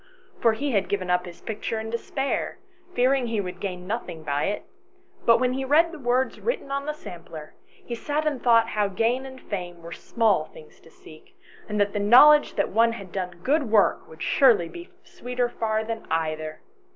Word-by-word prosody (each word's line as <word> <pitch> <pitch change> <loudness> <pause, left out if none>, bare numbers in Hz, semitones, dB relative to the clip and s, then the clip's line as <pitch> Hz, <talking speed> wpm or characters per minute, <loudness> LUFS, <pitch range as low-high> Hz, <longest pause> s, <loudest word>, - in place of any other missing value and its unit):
For 230 - +4
he 280 +5 -2
had 200 -4 0
given 185 -3 -1
up 180 0 +1
his 175 - -11
picture 220 +1 -4
in 220 0 -6
despair, 270 +4 -2 0.4
fearing 255 0 +2
he 225 -2 -1
would 180 -2 -5
gain 180 -2 -5
nothing 185 -6 -5
by 145 -1 -1
it, 205 - -2 0.6
but 230 - +7
when 250 0 +1
he 270 +1 -2
read 315 +5 +4
the 335 - -9
words 255 0 0
written 465 - -3
on 280 +1 -2
the 300 - -1
sampler, 165 - -10 0.3
he 240 - -5
sat 295 +6 -2
and 290 -5 -1
thought 230 -2 +4
how 210 -1 0
gain 230 +7 0
and 260 0 -11
fame 175 -6 -6
were 170 - -9
small 215 -8 +1
things 155 - -16
to - - -19
seek, 155 -1 -17 0.3
and 210 0 -2
that 205 0 +1
the 205 - -1
knowledge 275 +9 +7
that - - 0
one 230 +2 +3
had 195 -5 -9
done 185 -1 -3
some 175 0 -19
good 285 -2 +1
work 210 -2 +3
would 160 0 -9
surely 235 -11 +4
be 345 - -10
sweeter 245 0 -3
far 220 -2 -1
than 225 0 -6
either. 155 -1 -2
225 Hz, 200 wpm, -25 LUFS, 180-255 Hz, 0.6 s, but